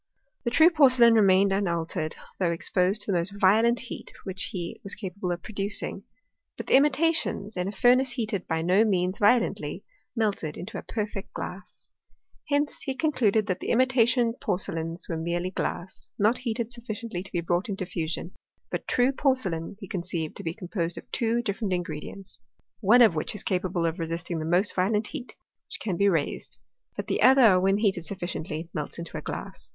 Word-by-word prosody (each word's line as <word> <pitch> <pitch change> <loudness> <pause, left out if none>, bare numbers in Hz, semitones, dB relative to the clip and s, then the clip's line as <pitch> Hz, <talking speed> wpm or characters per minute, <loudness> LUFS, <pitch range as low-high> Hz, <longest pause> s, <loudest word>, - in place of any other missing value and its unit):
The - - +2
true 320 +8 +6
porcelain 255 -7 +6
remained 195 -2 +5
unaltered, 170 -5 -1 0.2
though 180 -3 +2
exposed 180 +4 +1
to 205 - -2
the 180 - +2
most 200 +4 -5
violent 225 +5 +4
heat 250 - -8
which 190 -1 -2
he 175 -3 -5
was 200 - -5
capable 190 -3 -4
of 175 -1 -4
producing; 200 -1 -4 0.5
but - - -6
the - - -1
imitations, 285 -6 +2
in 180 0 -1
a - - -2
fur 245 +5 +5
nace 260 0 +1
heated 220 -6 -3
by 160 -1 -1
no 185 +5 +4
means 185 -3 0
violently, 230 +4 +2 0.3
melted 205 -9 -1
into 195 +6 -6
a - - -7
perfect 210 -3 -5
glass. 180 0 -8 0.6
Hence 290 0 0
he 270 - -3
concluded, 240 -9 +2
that 185 -3 -2
the - - -5
imita 255 -1 +4
tion 235 -1 +2
porcelains 170 -6 -2
were 165 - -3
merely 175 +2 -2
glass, 185 -1 -4
not 215 +4 +2
heated 235 -2 -2
suffi 240 -2 -6
ciently 200 -6 -5
to 190 - -10
be 175 - -1
brought 175 +5 -1
into 195 -2 -3
fusion; 170 -1 -3 0.4
but - - -4
true 250 +2 +3
porcelain 205 - 0
he 195 - -8
conceived 170 -3 -4
to - - -8
be 165 0 -3
composed 175 -2 -3
of - - -7
two 235 0 0
different 200 -2 -2
ingre 165 -4 -4
dients, 195 -1 -10 0.4
one 235 +4 +6
of 220 - +5
which 155 +6 -3
is 210 - -4
capable 180 -2 -1
of 165 +2 -1
resisting 165 0 -3
the 155 - -3
most 180 +5 +2
violent 210 +4 +1
heat 245 +3 -7 0.3
which - - -5
can 195 -5 -2
be 200 +3 +3
raised, 165 -6 -2 0.4
but - - -4
the - - -1
other, 250 -8 +7
when 195 +2 +3
heated 200 -5 +1
sufficiently, 170 -2 -4
melts 150 - -4
into 170 -1 -7
a - - -3
glass. - - -7
195 Hz, 190 wpm, -27 LUFS, 175-230 Hz, 0.6 s, other